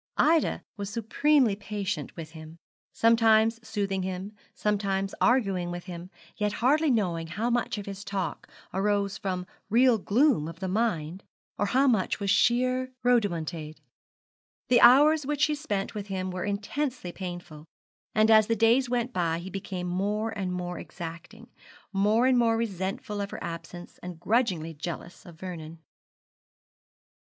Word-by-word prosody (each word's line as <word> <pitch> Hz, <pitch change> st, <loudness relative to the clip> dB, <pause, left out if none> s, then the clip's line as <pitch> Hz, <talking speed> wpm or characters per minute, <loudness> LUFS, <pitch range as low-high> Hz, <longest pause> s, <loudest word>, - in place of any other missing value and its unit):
Ida 320 Hz, 0 st, +3 dB
was 200 Hz, -1 st, -4 dB
supremely 235 Hz, +2 st, +2 dB
patient 200 Hz, -7 st, -4 dB
with 160 Hz, -2 st, -8 dB
him, 160 Hz, 0 st, -11 dB, 0.3 s
sometimes 225 Hz, 0 st, +4 dB
soothing 205 Hz, -4 st, -2 dB
him, 190 Hz, +2 st, -4 dB, 0.2 s
sometimes 195 Hz, -2 st, -1 dB
arguing 195 Hz, -8 st, +2 dB
with 175 Hz, 0 st, -5 dB
him; 180 Hz, -1 st, -8 dB, 0.3 s
yet 210 Hz, 0 st, 0 dB
hardly 290 Hz, +8 st, +2 dB
knowing 175 Hz, -9 st, 0 dB
how 215 Hz, +9 st, -2 dB
much 240 Hz, -2 st, 0 dB
of 205 Hz, -, -6 dB
his 200 Hz, 0 st, -7 dB
talk 195 Hz, -3 st, -4 dB, 0.2 s
arose 200 Hz, 0 st, 0 dB
from 185 Hz, -2 st, -3 dB, 0.2 s
real 240 Hz, +1 st, +4 dB
gloom 225 Hz, -, +2 dB
of 165 Hz, +1 st, -9 dB
mind, 185 Hz, -4 st, -1 dB, 0.4 s
or 205 Hz, -, +1 dB
how 260 Hz, +6 st, +3 dB
much 215 Hz, -7 st, +1 dB
was 200 Hz, -2 st, 0 dB
sheer 255 Hz, +4 st, +2 dB
rhodomontade. 170 Hz, -9 st, 0 dB, 0.9 s
The 245 Hz, -, +5 dB
hours 290 Hz, +4 st, +7 dB
which 295 Hz, -1 st, -1 dB
she 300 Hz, -, +3 dB
spent 210 Hz, -10 st, -3 dB
with 205 Hz, -1 st, -5 dB
him 185 Hz, -1 st, -3 dB
were 180 Hz, 0 st, -4 dB
intensely 210 Hz, +1 st, -3 dB
painful, 175 Hz, -5 st, -8 dB, 0.5 s
and 215 Hz, +1 st, +4 dB
as 215 Hz, -1 st, +6 dB
the 230 Hz, -, +1 dB
days 235 Hz, +4 st, +3 dB
went 245 Hz, 0 st, -1 dB
by 165 Hz, -2 st, 0 dB
he 180 Hz, +3 st, -7 dB
became 185 Hz, -1 st, -5 dB
more 205 Hz, +5 st, -1 dB
and 190 Hz, -3 st, -2 dB
more 180 Hz, -1 st, -4 dB
exacting, 175 Hz, +7 st, -9 dB, 0.4 s
more 210 Hz, +5 st, +3 dB
and 255 Hz, -1 st, +4 dB
more 230 Hz, -1 st, +3 dB
resentful 205 Hz, -1 st, -3 dB
of 200 Hz, -, -3 dB
her -, -, -7 dB
absence, 170 Hz, +1 st, -8 dB
and 175 Hz, -2 st, -8 dB
grudgingly 185 Hz, -6 st, 0 dB
jealous 170 Hz, +4 st, -7 dB
of 165 Hz, -2 st, -13 dB
Vernon. 165 Hz, -3 st, -7 dB
200 Hz, 145 wpm, -27 LUFS, 180-230 Hz, 0.9 s, hours